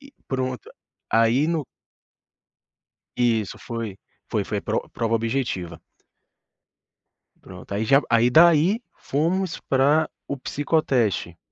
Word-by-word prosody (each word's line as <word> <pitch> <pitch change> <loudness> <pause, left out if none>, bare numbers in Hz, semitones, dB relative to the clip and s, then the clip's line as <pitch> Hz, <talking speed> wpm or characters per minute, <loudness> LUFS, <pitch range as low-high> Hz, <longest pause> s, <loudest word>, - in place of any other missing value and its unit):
E 280 0 -16 0.2
pronto, 130 -3 -3 0.4
a 115 - +4
aí 125 +7 +3
no. 165 -4 -1 1.5
Isso 115 -4 +1
foi. 115 -5 -5 0.3
Foi - - 0
foi - - -3
pro - - -2
prova 115 0 0
objetiva. 115 -8 -2 1.6
Pronto, - - -10
aí 110 +2 -1
já 135 +4 +5
aí 115 +1 +4
daí 170 - +5
fomos 170 +5 -1
para 145 +4 +2 0.2
o 140 - -3
psicoteste. 130 - 0
130 Hz, 110 wpm, -23 LUFS, 115-155 Hz, 1.6 s, já